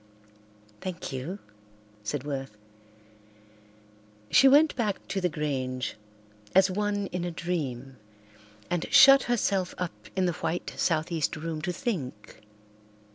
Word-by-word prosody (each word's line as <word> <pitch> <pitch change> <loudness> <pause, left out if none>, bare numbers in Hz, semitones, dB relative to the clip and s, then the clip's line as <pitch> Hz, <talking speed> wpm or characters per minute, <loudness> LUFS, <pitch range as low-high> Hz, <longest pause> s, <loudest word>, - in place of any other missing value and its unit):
"Thank 180 -5 -5
you," 140 +9 -4 0.7
said 130 +5 -3
Worth. 135 -6 -5 1.7
She 270 - +7
went 295 +3 +6
back 210 -5 -2
to 195 - -1
the 180 - +1
Grange 130 -4 -3 0.6
as 190 0 +6
one 205 +1 -1
in 180 -1 -3
a 175 - -2
dream 140 -7 -4 0.7
and 175 -1 -2
shut 275 0 +9
herself 200 -6 0
up 180 -2 -3 0.2
in 190 -1 +2
the 175 - +1
white 165 +2 -3
southeast 160 -2 0
room 155 0 -4
to 180 +3 -2
think. 160 - -5
175 Hz, 120 wpm, -28 LUFS, 145-195 Hz, 1.7 s, shut